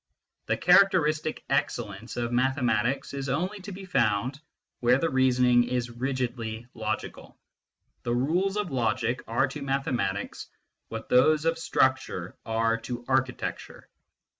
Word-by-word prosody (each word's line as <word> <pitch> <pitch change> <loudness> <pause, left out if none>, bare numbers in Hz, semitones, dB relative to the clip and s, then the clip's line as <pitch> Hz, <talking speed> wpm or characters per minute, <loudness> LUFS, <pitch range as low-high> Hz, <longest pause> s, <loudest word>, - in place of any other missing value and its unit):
The - - +1
characteristic 155 -6 +3
excellence - - -2
of 120 0 -1
mathematics 125 -1 +1
is 135 -1 -4
only 185 +9 -1
to 200 +2 -8
be 190 +1 -8
found 125 - 0 0.4
where 125 +1 +4
the 165 +4 0
reasoning 125 -2 +4
is 120 -1 -2
rigidly 120 -2 -3
logical: 110 -1 -5 0.6
the 120 - -1
rules 180 +10 +1
of 205 -6 -2
logic 120 -1 0
are 120 +4 +2
to 145 +2 -7
mathematics 125 -8 -2 0.4
what - - -6
those 150 +5 +4
of 165 0 +1
structure 130 - 0
are 115 0 +1
to 120 +1 -6
architecture. 130 -1 -2
130 Hz, 125 wpm, -27 LUFS, 120-150 Hz, 0.6 s, where